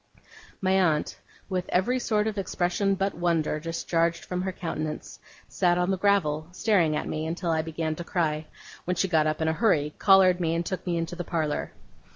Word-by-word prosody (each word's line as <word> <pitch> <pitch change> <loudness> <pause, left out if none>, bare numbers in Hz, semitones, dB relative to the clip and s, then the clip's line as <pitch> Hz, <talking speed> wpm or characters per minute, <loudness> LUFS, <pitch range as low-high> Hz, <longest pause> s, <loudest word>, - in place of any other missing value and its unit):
My 185 -1 +1
aunt, 175 -6 +1 0.3
with 185 -2 -3
every 245 +8 +1
sort 215 -3 +1
of 215 -2 -2
expression 195 +1 0
but 195 +1 -1
wonder 165 -3 0
discharged 165 +1 -1
from 180 0 -3
her 190 0 -2
countenance, 155 -4 -5 0.3
sat 175 -2 +1
on 180 +2 +1
the 190 - 0
gravel, 160 -7 +2
staring 185 -6 +2
at - - -2
me, 155 +1 -3
until 170 +1 -2
I 160 -1 +2
began 160 0 -3
to 175 - -5
cry; 155 -3 -1 0.4
when 180 - 0
she 190 - +1
got 160 -4 +2
up 155 +1 -1
in - - 0
a - - +3
great 160 - -6
hurry, 150 -10 +2
collared 190 -2 +6
me, 165 -2 0
and 170 +1 -1
took 185 +1 -4
me 170 -1 0
into 165 +1 -3
the 175 - -4
parlour. 160 -3 -2
175 Hz, 200 wpm, -26 LUFS, 160-190 Hz, 0.4 s, collared